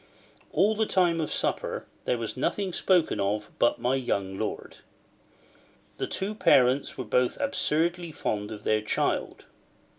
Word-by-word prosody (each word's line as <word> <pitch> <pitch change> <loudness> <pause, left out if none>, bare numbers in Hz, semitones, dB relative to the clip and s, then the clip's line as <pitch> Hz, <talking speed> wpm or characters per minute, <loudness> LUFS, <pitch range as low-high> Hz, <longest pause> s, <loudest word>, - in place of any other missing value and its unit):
All 200 +7 +3
the 220 0 +1
time 175 -3 +2
of 155 - -3
supper, - - -1 0.2
there 125 - +1
was 115 -2 -4
nothing 185 +8 -1
spoken 180 -3 +2
of 105 +2 -1
but 120 - +3
my 125 +2 0
young 100 -7 -1
lord. 110 +2 -4 1.2
The - - -1
two 195 +3 -3
parents 135 -9 +3
were 130 - -4
both 125 +3 +1
absurdly 175 - 0
fond 105 -7 -3
of 105 - -8
their 110 0 +2
child. 105 - -1
130 Hz, 145 wpm, -27 LUFS, 110-175 Hz, 1.2 s, All